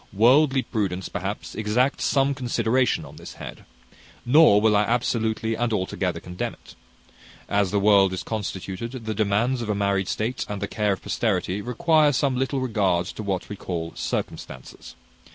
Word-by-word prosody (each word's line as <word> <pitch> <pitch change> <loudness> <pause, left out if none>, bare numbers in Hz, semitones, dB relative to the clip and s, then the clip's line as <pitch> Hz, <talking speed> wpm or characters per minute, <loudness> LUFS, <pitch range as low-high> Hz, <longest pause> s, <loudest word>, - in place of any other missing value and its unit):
Worldly 130 +5 +4
prudence, 95 -5 -2
perhaps, - - -5
exacts 110 +6 0
some 140 0 +2
consideration 125 -1 0
on - - -13
this - - -10
head; - - -9 0.6
nor 130 -4 +6
will 110 0 +3
I 105 - +4
absolutely 115 -1 0
and 120 +1 -1
altogether 95 -4 -1
condemn 90 0 -5
it. - - -17 0.7
As 100 -2 +1
the 105 - +1
world 100 -2 +5
is 95 -2 -4
constituted, 110 +3 -5
the 110 - -2
demands 110 +5 +1
of 115 - -4
a 105 - +1
married 100 -1 0
state, 115 +4 -2
and 105 -1 -4
the 100 - -3
care 105 -2 0
of 95 - -8
posterity, 95 +3 -1
require 155 +5 +3
some 135 +1 +1
little 135 +1 -1
regard 100 -8 +1
to - - -7
what 95 -3 -3
we 105 - -6
call 85 -4 -4
circumstances. - - -6
110 Hz, 165 wpm, -24 LUFS, 100-125 Hz, 0.7 s, nor